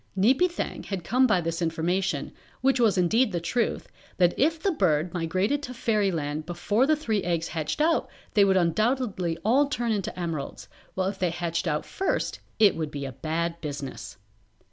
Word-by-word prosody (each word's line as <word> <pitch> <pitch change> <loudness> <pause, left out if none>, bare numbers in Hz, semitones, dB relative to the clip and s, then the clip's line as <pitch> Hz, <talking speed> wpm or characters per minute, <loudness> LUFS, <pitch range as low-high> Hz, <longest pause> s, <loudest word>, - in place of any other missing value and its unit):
Neepy 265 - +4
Thang 345 - -4
had 195 -4 -5
come 255 +8 +3
by 210 -6 +3
this 165 +1 -3
information, 170 +3 -1 0.3
which 265 0 +3
was 220 -5 +3
indeed 215 +7 +3
the 175 - -1
truth, 230 +7 -1 0.3
that 175 -2 +4
if 320 +4 +2
the 390 - +1
bird 170 - +1
migrated 185 - 0
to 250 -3 -7
Fairyland 175 -10 0
before 205 +8 +1
the 310 - +4
three 225 -9 -1
eggs 170 -2 -1
hatched 155 - -3
out 320 +2 +2 0.2
they 210 -4 +5
would 190 -1 +4
undoubtedly 190 -1 +1
all 270 +6 +4
turn 240 -4 -1
into 200 -3 -2
emeralds, 150 - -4 0.3
while 185 0 0
if 195 0 -4
they 180 - +1
hatched 170 +1 -2
out 150 -1 -1
first 385 - -2 0.2
it 210 -3 +5
would 160 -2 -3
be 140 -1 -5
a 135 - -4
bad 165 +5 -3
business. 140 -6 -6
185 Hz, 180 wpm, -26 LUFS, 165-235 Hz, 0.3 s, they